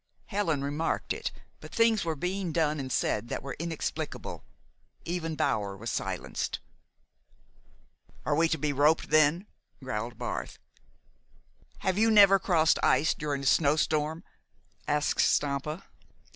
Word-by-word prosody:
Helen 170 -9 -1
remarked 145 +3 -1
it; - - -4 0.3
but - - -12
things 230 -2 +3
were 165 -2 -2
being 180 +3 -2
done 155 -2 +1
and 130 -1 -5
said 110 -2 0
that - - -4
were 135 -1 -5
inexplicable. 165 -1 -4 0.6
Even 165 -2 -3
Bower 100 -8 -1
was 115 +3 -4
silenced. - - -3 1.7
"Are 150 - +1
we 165 +2 +4
to 160 - 0
be 145 0 -1
roped, 150 +3 +2
then?" 155 +4 +4 0.4
growled 120 -2 -4
Barth. - - -4 1.2
"Have 190 +1 0
you 225 +1 +4
never 200 -2 +7
crossed 170 -6 +3
ice 160 - +3
during 145 -3 -3
a - - -5
snow 145 +1 +4
storm?" 155 +1 0 0.6
asked 150 0 +1
Stampa. 145 +4 0
155 Hz, 130 wpm, -29 LUFS, 140-170 Hz, 1.7 s, never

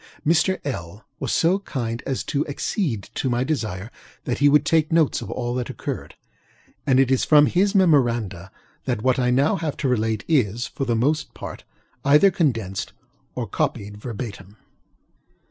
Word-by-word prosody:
Mr. 170 +4 +3
LŌĆöl 100 - -5 0.2
was - - -2
so 180 +4 +3
kind 120 - -4
as 135 - -1
to 145 0 -1
accede 145 - -2
to 130 - -1
my 120 +1 +1
desire 110 -8 -3 0.3
that 120 - -2
he 145 +1 +5
would 150 +1 +4
take 160 0 +2
notes 160 -3 +2
of - - -7
all 120 -1 -3
that 125 -1 -3
occurred, - - -6 0.7
and 130 -1 +4
it 135 -1 +3
is 130 - +3
from 150 -1 +6
his 195 +6 +1
memoranda 120 - +2 0.3
that 120 -5 -2
what 130 0 +2
I 125 -1 +2
now 135 +5 +3
have 155 -3 -3
to 140 - -1
relate 110 -3 0
is, 120 -7 +1
for 135 - -4
the 120 -2 +1
most 150 +6 0
part, - - -8 0.4
either 150 +8 +6
condensed 115 - -1 0.4
or - - -2
copied 105 0 -2
verbatim. 105 -3 -7
130 Hz, 165 wpm, -23 LUFS, 115-150 Hz, 0.7 s, from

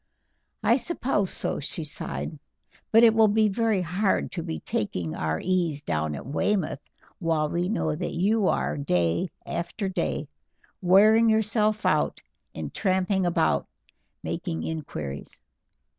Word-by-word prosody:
"I 230 +4 +4
suppose 260 - -1
so," - - -1
she 160 +3 -4
sighed; 150 0 -5 0.5
"but 225 +1 +7
it 225 -1 +7
will 220 -1 +5
be 215 +1 +3
very 215 -2 +1
hard 190 +4 0
to 175 - -4
be 165 -1 -4
taking 90 -6 -2
our 80 0 -1
ease 170 -5 0
down 80 - -1
at - - -8
Weymouth 155 - 0 0.4
while 160 -3 +1
we 175 +3 -1
know 160 -8 0
that 175 +2 -4
you 200 +3 +2
are, - - 0
day 90 - +1 0.2
after 185 +4 -3
day, 185 - -2 0.5
wearing 215 +5 +6
yourself 215 0 +2
out - - +2 0.4
in - - -5
tramping 190 -1 +1
about 175 - +1 0.6
making 165 -1 -3
inquiries." 75 - -5
180 Hz, 135 wpm, -26 LUFS, 155-215 Hz, 0.6 s, but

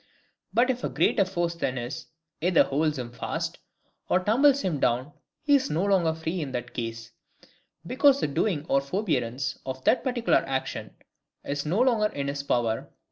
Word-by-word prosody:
But 250 +3 +3
if 250 -1 -6
a - - 0
greater 195 - +2
force 175 -2 -1
than 130 -6 -2
his, 120 +1 -5 0.3
either 180 +1 +5
holds 150 +2 0
him 120 -2 -5
fast, - - -4 0.5
or 180 - +4
tumbles 265 +8 +4
him 170 -7 -1
down, 125 +4 +1 0.3
he 295 -1 +3
is 275 -2 +3
no 160 +6 0
longer 180 -5 +2
free 160 +2 -3
in 135 -3 -5
that 120 -1 -4
case; 115 -1 -5 0.7
because 275 - +4
the - - 0
doing 150 +2 0
or 135 - +3
forbearance 140 - -2
of 130 0 -6
that 250 - +3
particular 245 -3 +2
action 135 -1 -3 0.5
is 140 +1 -3
no 185 +9 +2
longer 235 -5 +3
in 140 -8 -4
his 140 0 -3
power. 120 -5 -1
160 Hz, 175 wpm, -27 LUFS, 130-210 Hz, 0.7 s, either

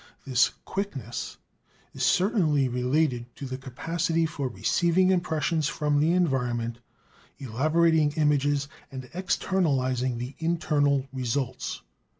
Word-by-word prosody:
This 130 -2 +3 0.2
"quickness" 145 - -4 0.6
is - - -7
certainly 175 - +3
related 125 0 0
to 140 - -7
the 130 0 -5
capacity 165 +5 -1
for 145 -4 -3
receiving 175 +8 +2
impressions 160 -3 0
from 150 -1 0
the 160 +3 +3
environment, 125 -9 0 0.6
elaborating 155 +5 +2
images, 145 -2 +2 0.2
and 130 -1 -7
externalizing 135 -9 0
the 125 +3 -5
internal 150 -4 +1
results. 130 0 -3
145 Hz, 105 wpm, -27 LUFS, 130-165 Hz, 0.6 s, This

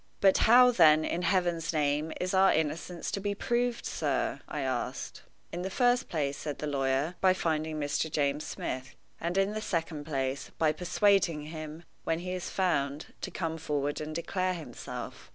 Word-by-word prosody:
"But 195 -1 +5
how, 250 +1 +8
then, 155 -7 +6
in 175 - -1
Heaven's 175 -3 +1
name, 150 0 0
is 185 +1 -1
our 190 0 +6
innocence 160 +3 -2
to - - -2
be 200 +1 -2
proved, 240 +3 0
sir?" - - -1
I - - -4
asked. - - -3 0.3
"In 175 - -4
the 190 - -2
first 245 +4 +2
place," 145 -4 -1
said 150 -2 -4
the - - -4
lawyer, 135 +2 0
"by 185 -1 +5
finding 155 -3 -1
Mr. 145 +2 -1
James 145 0 0
Smith; 130 0 -5 0.2
and, 170 +3 -2
in 195 +1 +3
the 215 - -3
second 165 -6 -2
place, 135 -2 -2
by 155 -2 +3
persuading 180 -2 +2
him, 155 +1 -7 0.2
when 165 - 0
he 180 +2 -4
is 180 -1 -4
found, 150 -6 -1
to - - -3
come 165 -2 -3
forward 145 -2 -1
and 155 0 -5
declare 185 +2 -1
himself." 150 -8 -8
165 Hz, 175 wpm, -30 LUFS, 150-185 Hz, 0.3 s, how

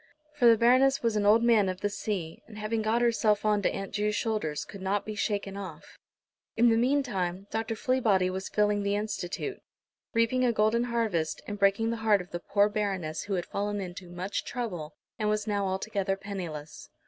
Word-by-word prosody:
For 270 -5 +4
the 230 -1 +7
Baroness 255 +4 +4
was 230 -2 +1
an 205 -1 +2
old 225 +3 +6
Man 220 -5 +4
of 185 0 -5
the - - +1
Sea, 190 -6 -4
and 215 - -12
having 215 +1 -1
got 225 +2 +1
herself 220 -3 +2
on 210 -1 +3
to - - +2
Aunt 195 -1 -5
Ju's 210 0 0
shoulders 210 -11 -1
could 200 - -10
not 195 +2 -1
be 215 - -4
shaken 205 -3 -2
off. 185 -4 -9 0.6
In 235 +1 +6
the 225 - +4
meantime 225 -8 0
Dr. 225 0 -2
Fleabody 220 -6 +2
was 190 +1 -4
filling 210 -1 +2
the 200 0 0
Institute, 210 - -3 0.5
reaping 230 +3 +2
a 245 - +4
golden 220 +2 +2
harvest, 220 -10 -1
and 205 0 -6
breaking 200 +3 +3
the 230 - -2
heart 220 -2 +3
of 180 -1 -9
the 175 - -3
poor 205 +3 +2
Baroness, 195 -7 -2
who 200 - -1
had 175 -1 -2
fallen 205 +1 -2
into 180 -1 -7
much 180 +3 -3
trouble 180 -11 -5 0.2
and 210 -1 +1
was 210 0 0
now 205 -2 0
altogether 195 0 -1
penniless. 175 -7 -7
210 Hz, 195 wpm, -28 LUFS, 190-225 Hz, 0.6 s, the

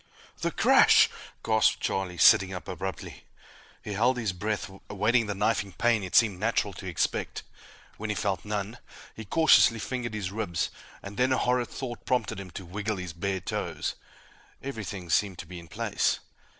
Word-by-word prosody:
"The - - 0
crash!" - - +6 0.3
gasped 110 -1 +3
Charlie, 95 -2 -2
sitting 95 +3 +6
up 90 - -8
abruptly. 95 0 -6 0.6
He 105 - -5
held 125 +5 +2
his 110 -6 -1
breath, 105 +2 -2 0.2
awaiting 110 +3 +2
the 105 - -2
knifing 100 -1 0
pain 115 -1 +2
it 95 - -5
seemed 105 -6 +4
natural 105 -1 0
to 95 +1 -8
expect. 85 -3 -2 0.5
When 110 0 -5
he 105 - 0
felt 100 -2 -1
none, 105 +2 -4 0.4
he 110 - -8
cautiously 140 -2 +5
fingered 120 0 -4
his 100 -3 -3
ribs, 100 -5 -2 0.3
and 100 +1 -8
then 130 +1 +2
a 130 - +3
horrid 125 -1 +1
thought 120 -3 -6
prompted 125 -6 0
him 95 -2 -8
to 95 +2 -8
wiggle 105 +4 -3
his 90 -3 -6
bare 95 +2 -2
toes. - - -3 0.7
Everything 100 -9 -5
seemed 95 +1 +2
to - - -7
be 90 +1 -9
in 85 - -13
place. - - 0
105 Hz, 170 wpm, -28 LUFS, 95-115 Hz, 0.7 s, crash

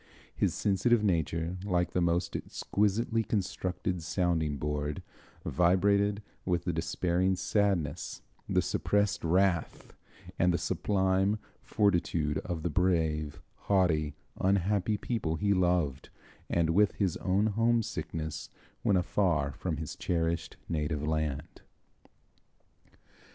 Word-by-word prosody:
His - - +1
sensitive 105 +3 +2
nature, 85 -1 0
like 90 -3 0
the 90 - 0
most 85 0 0
exquisitely 110 +3 0
constructed 90 -3 -2
sounding 80 -3 0
board, 75 0 -3 0.4
vibrated 100 +4 +2 0.2
with 90 -2 0
the 90 - -1
despairing 85 +3 0
sadness, 95 -8 -1 0.3
the - - +2
suppressed 105 0 0
wrath, 90 0 +1 0.5
and 90 +1 +4
the 85 - +1
sublime 95 +3 +1 0.2
fortitude 85 -7 +1
of 85 -3 -5
the 85 - 0
brave, 80 -3 +1 0.3
haughty, 80 -7 +2 0.2
unhappy 100 +2 +1
people 100 -9 -2
he 100 +5 +2
loved, 90 -7 +1 0.4
and 85 -1 +2
with 100 +4 +4
his 95 -5 0
own 95 +3 +1
homesickness 110 -8 -1 0.3
when 100 - +3
afar 85 -6 +1
from 80 +3 -3
his 80 -1 -5
cherished 85 -1 -1
native 75 -2 -1
land. 80 0 -2
90 Hz, 110 wpm, -30 LUFS, 80-100 Hz, 0.5 s, and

